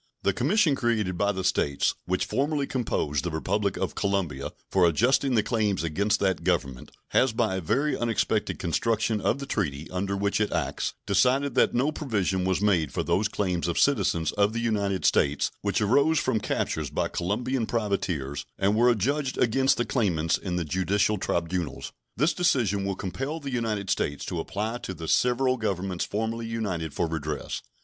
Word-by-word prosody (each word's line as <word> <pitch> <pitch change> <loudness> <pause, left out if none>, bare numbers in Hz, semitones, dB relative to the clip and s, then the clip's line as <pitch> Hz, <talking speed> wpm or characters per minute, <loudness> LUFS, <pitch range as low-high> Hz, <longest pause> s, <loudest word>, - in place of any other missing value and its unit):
The 100 - +2
commission 155 - +3
created 115 -8 0
by 100 +3 +1
the 95 -2 -4
States 75 -6 +1
which 90 0 0
formerly 145 +1 0
composed 80 - -1
the 85 - -1
Republic 95 +5 -1
of - - -2
Colombia 95 -9 -1 0.2
for 95 -2 +4
adjusting 125 - +2
the 110 - +3
claims 105 -5 0
against 100 +6 +1
that 95 -4 +1
Government 70 -8 -1 0.2
has 130 -3 +3
by 110 -4 0
a - - -3
very 140 - +1
unexpected 110 -2 0
construction 110 +5 0
of - - +1
the 140 - -6
treaty 80 - -2
under 100 +2 -2
which 100 +2 0
it 105 - 0
acts - - -2
decided 125 +7 +2
that 125 - +3
no 135 +5 +2
provision 100 - -1
was 95 +1 +1
made 90 -8 +2
for - - -2
those 105 +3 +1
claims 90 -5 -1
of 85 - -1
citizens 90 - +2
of 105 +1 +1
the 115 - -2
United 100 -5 0
States 70 0 +2
which 100 +2 0
arose 140 +9 +3
from 130 -6 +1
captures - - -2
by - - -1
Colombian 115 +7 -1
privateers 90 - -2
and 100 +2 +2
were 120 +3 +5
adjudged 130 +5 0
against 130 +3 +3
the 120 - 0
claimants 90 -8 +1
in 90 -3 -4
the 90 -2 -1
judicial 95 +5 +1
tribunals. 85 -3 -2 0.3
This 150 +6 +3
decision 120 - +1
will 100 -1 -1
compel 135 - -4
the 140 -3 -6
United 110 -5 -1
States 70 -1 -1
to - - -3
apply 110 +4 -3
to 105 -6 -6
the 80 0 -7
several 130 +4 +2
Governments 95 -5 -2
formerly 115 +2 -3
united 95 -9 -3
for 85 - -1
redress. 75 -2 -4
100 Hz, 175 wpm, -26 LUFS, 90-120 Hz, 0.3 s, were